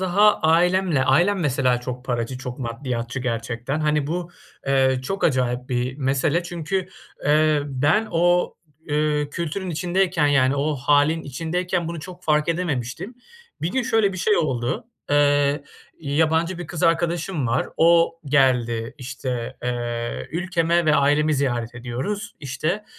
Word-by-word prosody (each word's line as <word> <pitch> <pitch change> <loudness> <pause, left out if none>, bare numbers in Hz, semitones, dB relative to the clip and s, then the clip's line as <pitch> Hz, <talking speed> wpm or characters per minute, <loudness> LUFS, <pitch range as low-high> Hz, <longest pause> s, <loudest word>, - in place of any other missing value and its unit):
daha 200 +3 +4
ailemle 170 -2 +3
ailem 175 +9 +3
mesela 130 -4 +1
çok 125 0 -6
paracı, 120 0 -2
çok 125 -2 -7
maddiyatçı 120 0 -4
gerçekten. 120 +3 -3
Hani 150 -2 +1
bu, 175 +2 -3 0.4
eee, 130 -1 +2
çok 195 +9 -3
acayip 125 -3 0
bir 125 +1 -1
mesele 145 +5 +1
çünkü, 175 +2 -3 0.4
eee, 150 0 +3
ben 145 +11 +1
o, 175 +1 +2 0.3
eee, 150 0 +1
kültürün 170 +4 -3
içindeyken 175 -1 +1
yani 140 -1 +3
o 150 +2 0
hâlin 145 +4 +2
içindeyken 170 +4 -2
bunu 170 -1 -5
çok 180 +3 -10
fark 150 0 +2
edememiştim. 160 - -2 0.5
Bir 170 - 0
gün, 265 - +1
şöyle 225 -5 +2
bir 185 - -6
şey 210 +3 +2
oldu. 125 - -1 0.2
Eee, 145 0 +3 0.4
yabancı 160 +4 +1
bir 175 - -6
kız 170 -1 -6
arkadaşım 165 -3 +1
var. 120 +3 0
O 165 0 +4
geldi, 125 -5 +1
işte, 125 -2 -5
eee, 120 -1 -3
ülkeme 170 -1 +1
ve 155 - +4
ailemi 145 +2 +3
ziyaret 120 -4 -1
ediyoruz. 130 - -4
İşte, 160 +9 -2
150 Hz, 140 wpm, -23 LUFS, 130-170 Hz, 0.5 s, daha